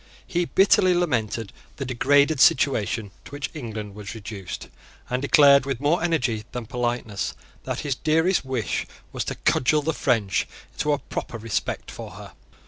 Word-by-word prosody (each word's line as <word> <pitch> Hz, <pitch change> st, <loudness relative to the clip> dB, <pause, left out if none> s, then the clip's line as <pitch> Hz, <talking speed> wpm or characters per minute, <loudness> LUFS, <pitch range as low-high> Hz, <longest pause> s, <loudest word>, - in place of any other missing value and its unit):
He 175 Hz, -1 st, 0 dB
bitterly 185 Hz, 0 st, +4 dB
lamented 115 Hz, -, -1 dB, 0.2 s
the 135 Hz, -, -4 dB
degraded 140 Hz, +4 st, +3 dB
situation 110 Hz, -6 st, +3 dB
to -, -, -12 dB
which 145 Hz, 0 st, -4 dB
England 110 Hz, -8 st, -6 dB
was 100 Hz, +1 st, -8 dB
reduced, 100 Hz, -4 st, -7 dB, 0.4 s
and 125 Hz, +1 st, 0 dB
declared, 140 Hz, -1 st, +6 dB
with 135 Hz, -4 st, -2 dB
more 150 Hz, +5 st, +2 dB
energy 130 Hz, -10 st, 0 dB
than 125 Hz, -2 st, -4 dB
politeness, 120 Hz, -3 st, -2 dB, 0.3 s
that -, -, -3 dB
his 145 Hz, -2 st, -1 dB
dearest 160 Hz, +7 st, +2 dB
wish 130 Hz, -4 st, -2 dB, 0.2 s
was -, -, -2 dB
to -, -, -3 dB
cudgel 150 Hz, +4 st, +2 dB
the 160 Hz, +2 st, 0 dB
French 110 Hz, -9 st, +1 dB, 0.3 s
into 150 Hz, -, 0 dB
a -, -, +1 dB
proper 120 Hz, -, -6 dB
respect 110 Hz, -2 st, -3 dB
for -, -, -8 dB
her. -, -, -10 dB
130 Hz, 155 wpm, -24 LUFS, 110-150 Hz, 0.4 s, declared